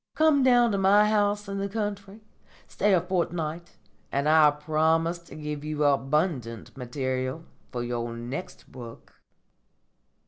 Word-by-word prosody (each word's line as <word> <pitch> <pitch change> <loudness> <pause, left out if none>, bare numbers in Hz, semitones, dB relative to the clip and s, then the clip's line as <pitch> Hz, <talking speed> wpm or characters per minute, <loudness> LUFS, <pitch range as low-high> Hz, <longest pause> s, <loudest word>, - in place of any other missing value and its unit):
Come 310 -3 +4
down 245 -2 +4
to 200 - 0
my 205 +2 +5
house 205 -1 +1
in 200 0 -4
the 200 0 -2
country, 205 -1 -5 0.5
stay 210 - 0
a 175 - +2
fortnight, 170 -2 -3 0.3
and 140 +2 0
I 155 -1 +6
promise 160 +3 0
to 170 - -14
give 150 -1 -5
you 150 0 -2
abundant 135 - 0
material 130 +3 -3 0.3
for 120 -1 -3
your 120 -1 -3
next 125 +9 -7
book." 120 -3 -12
160 Hz, 135 wpm, -26 LUFS, 135-200 Hz, 0.5 s, I